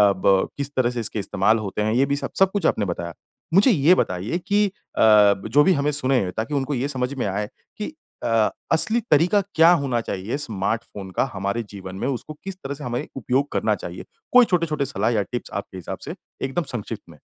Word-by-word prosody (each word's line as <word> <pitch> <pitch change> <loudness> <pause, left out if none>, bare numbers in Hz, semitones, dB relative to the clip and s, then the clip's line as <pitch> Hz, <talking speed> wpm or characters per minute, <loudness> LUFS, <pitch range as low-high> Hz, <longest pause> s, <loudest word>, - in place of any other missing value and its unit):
ब 95 0 +3
किस 140 0 -3
तरह 130 -2 +2
से 125 -1 -4
इसके 110 -1 -2
इस्तेमाल 100 +2 +2
होते 105 0 -3
हैं, 110 +1 +1
ये 130 +3 +3
भी 140 +1 0
सब - - -4
सब 195 -1 +5
कुछ 205 -1 -2
आपने 105 - +2
बताया। 85 -2 -4 0.4
मुझे 205 +7 +6
ये 160 0 +5
बताइए 95 - -1
कि 205 +1 +3
अ, 195 - -7 0.8
जो 145 +1 +5
भी 190 - +4
हमें 145 -1 +1
सुनें, 130 -9 +1
ताकि 115 +7 -2
उनको 140 +1 -1
ये 130 +1 -1
समझ 130 -1 -2
में 125 - -1
आए 100 +1 -2 0.3
कि 210 - -3 0.4
अ, 115 -2 +3 0.2
असली 220 +8 +3
तरीका 170 +7 +4
क्या 165 +2 +7
होना 120 -4 0
चाहिए 105 +5 -4
स्मार्टफ़ोन 105 -4 -3
का 95 - +1
हमारे 100 +4 -2
जीवन 95 -2 -8
में? 100 - -3
उसको 140 +3 -4
किस 195 -1 -5
तरह 135 - -3
से 145 +1 -9
हमें 120 0 -3
उपयोग 135 +3 0
करना - - +1
चाहिए? - - -8 0.3
कोई 250 -1 +8
छोटे-छोटे 165 -7 0
सलाह 115 -4 -1
या 110 -3 +2
टिप्स 120 - -4
आपके 100 -1 -5
हिसाब 90 - -6
से, - - -6 0.3
एकदम 135 +6 -1
संक्षिप्त 110 -1 -5
में। 75 - -15
125 Hz, 210 wpm, -23 LUFS, 105-150 Hz, 0.8 s, कोई